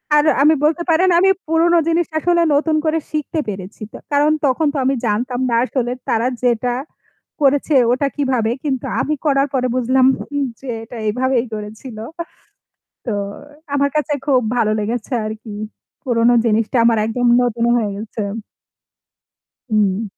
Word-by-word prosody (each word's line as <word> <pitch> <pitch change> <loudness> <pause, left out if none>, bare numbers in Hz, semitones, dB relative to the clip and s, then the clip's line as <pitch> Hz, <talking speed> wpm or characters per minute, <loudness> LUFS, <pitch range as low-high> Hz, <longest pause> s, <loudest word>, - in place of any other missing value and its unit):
আর 295 - +5 0.2
আমি 305 +2 +6
বলতে 325 +3 +1
পারেন 355 +4 +3
আমি 385 +2 +4 0.2
পুরনো 330 +2 +3
জিনিসটা 335 -1 0
আসলে 345 0 +3
নতুন 310 +2 +1
করে 315 +1 +1
শিখতে 310 +1 -2
পেরেছি। 195 +1 -8
তো - - -7 0.2
কারণ 290 +1 +4
তখন 280 +3 +2
তো - - -3
আমি 270 +1 +2
জানতাম 245 +4 -1
না - - +2
আসলে 250 -2 -2 0.2
তারা 230 +2 +1 0.2
যেটা 245 0 +1 0.7
করেছে 285 +1 +2 0.2
ওটা 260 +3 +1
কিভাবে 255 -6 0
কিন্তু 265 -4 -1 0.2
আমি 305 - -1
করার 275 -1 +3
পরে 255 -1 +1
বুঝলাম 255 +1 +3
হুম 285 -1 -3 0.2
যে 270 - -10 0.2
এটা 230 +1 -10
এভাবেই 250 +2 0
করেছিল। 215 +3 -8 1.1
তো 240 - -2 0.6
আমার 280 0 +2
কাছে 300 0 0
খুব 265 -4 +3 0.2
ভালো 215 -3 +2
লেগেছে 225 +4 -3
আরকি। 215 0 -7 0.5
পুরোনো 240 -1 +3
জিনিসটা 225 +2 +1
আমার 230 -2 +3
একদম 245 +2 0
নতুন 235 -1 0
হয়ে 220 -3 0
গেছে। 215 +1 -6 1.5
হুম। 210 -1 +1
255 Hz, 150 wpm, -19 LUFS, 225-295 Hz, 1.5 s, আমি